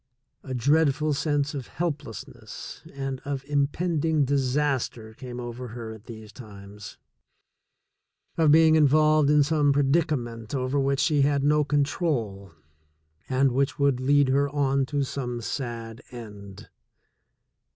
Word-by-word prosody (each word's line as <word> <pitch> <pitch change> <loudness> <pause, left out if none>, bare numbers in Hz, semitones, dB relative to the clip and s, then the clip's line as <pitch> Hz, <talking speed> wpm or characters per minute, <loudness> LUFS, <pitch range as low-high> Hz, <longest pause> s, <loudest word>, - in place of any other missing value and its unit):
A 130 -2 -6
dreadful 150 +3 +2
sense 145 +1 -1
of 135 -4 -6
helplessness 145 - -6
and 135 -1 -5
of 140 -1 -4
impending 150 +1 0
disaster 130 -4 -1
came 125 +1 -8
over 120 +1 -6
her 115 -1 -7
at 110 0 -14
these 110 -2 -10
times, 100 -4 -11 1.4
of 160 -2 +3
being 160 +1 +6
in 155 -2 +5
volved 155 0 +4
in 150 -1 +5
some 145 -1 +2
predicament 135 -5 0
over 130 +2 -1
which 135 0 +1
she 150 -4 +2
had 140 0 +2
no 150 +1 +3
control, 140 - -1 0.8
and 135 0 +2
which 135 +3 0
would 140 -3 +2
lead 140 +1 +3
her 140 +2 +2
on 140 -2 0
to 145 -1 -1
some 125 -3 -4
sad 115 -1 -5
end. 105 -5 -11
140 Hz, 130 wpm, -26 LUFS, 120-145 Hz, 1.4 s, being